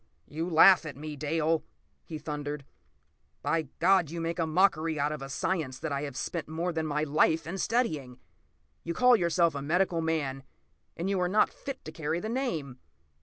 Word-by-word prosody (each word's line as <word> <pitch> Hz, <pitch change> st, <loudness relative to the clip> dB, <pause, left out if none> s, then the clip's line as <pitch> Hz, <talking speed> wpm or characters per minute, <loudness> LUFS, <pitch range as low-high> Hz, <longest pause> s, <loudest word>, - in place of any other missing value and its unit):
p> -, -, -20 dB
"You 165 Hz, +3 st, -2 dB
laugh 175 Hz, +3 st, +7 dB
at 140 Hz, -, -7 dB
me, 150 Hz, +1 st, -6 dB
Dale," 155 Hz, +2 st, 0 dB, 0.4 s
he 160 Hz, -, -7 dB
thundered. 150 Hz, -1 st, -5 dB, 0.8 s
"By 160 Hz, -2 st, 0 dB
God, 185 Hz, -2 st, +4 dB
you 170 Hz, +2 st, -5 dB
make 165 Hz, +1 st, -3 dB
a 165 Hz, -, +1 dB
mockery 160 Hz, -2 st, +2 dB
out 145 Hz, +1 st, +1 dB
of 150 Hz, -2 st, -5 dB
a 135 Hz, -, -6 dB
science 140 Hz, -2 st, -2 dB
that 160 Hz, +2 st, -4 dB
I 140 Hz, 0 st, -1 dB
have 140 Hz, -3 st, -5 dB
spent 170 Hz, -3 st, -3 dB
more 170 Hz, +3 st, -2 dB
than 160 Hz, -1 st, -1 dB
my 150 Hz, 0 st, 0 dB
life 155 Hz, +2 st, +2 dB
in 185 Hz, +4 st, -5 dB
studying! 155 Hz, -, -1 dB, 0.7 s
You 170 Hz, 0 st, -4 dB
call 250 Hz, -1 st, +6 dB
yourself 170 Hz, -3 st, +2 dB
a 140 Hz, -, -4 dB
medical 170 Hz, +3 st, +1 dB
man—and 155 Hz, +2 st, -5 dB
you 195 Hz, -1 st, 0 dB
are 180 Hz, -, +1 dB
not 210 Hz, +3 st, +3 dB
fit 275 Hz, -2 st, -7 dB
to 155 Hz, -, -6 dB
carry 160 Hz, +1 st, -2 dB
the 215 Hz, -, -4 dB
name! 165 Hz, -, -3 dB
160 Hz, 190 wpm, -29 LUFS, 150-175 Hz, 0.8 s, laugh